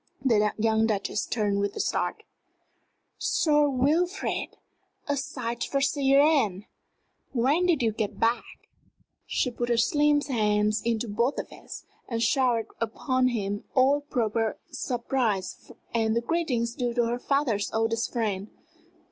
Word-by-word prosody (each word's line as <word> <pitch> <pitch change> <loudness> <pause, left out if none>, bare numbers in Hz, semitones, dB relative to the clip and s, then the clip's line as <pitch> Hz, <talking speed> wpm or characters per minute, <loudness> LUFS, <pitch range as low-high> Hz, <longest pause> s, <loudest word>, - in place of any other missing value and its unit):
The 210 -4 +3
young 220 0 +2
Duchess 210 -1 -1
turned 205 -3 0
with 200 0 -1
a - - -5
start. - - -1 1.0
"Sir 295 -3 +2
Wilfrid! 325 +9 0 0.5
A 285 - +1
sight 260 -4 -4
for 275 - -1
sair 275 -1 +3
een. 245 - +3 0.7
When 280 +9 +2
did 315 -8 +2
you 225 - +2
get 215 -1 -4
back?" 230 +1 +2 0.8
She 250 - 0
put 240 0 -3
her 235 - +2
slim 295 +4 +3
hands 215 -5 +1
into 230 0 -1
both 235 +6 0
of - - -4
his, - - -10 0.3
and 230 -2 -2
showered 240 -1 +2
upon 255 +3 0
him 205 -4 -2
all 275 +2 +4
proper 230 -6 -1
surprise 235 -7 -2 0.2
and 220 -1 +1
the 235 - +2
greetings 245 -5 -1
due 240 -1 -2
to 240 -1 +2
her 240 +1 -2
father's 250 -7 0
oldest 225 +1 0
friend. 210 -5 -2
235 Hz, 140 wpm, -27 LUFS, 220-275 Hz, 1.0 s, all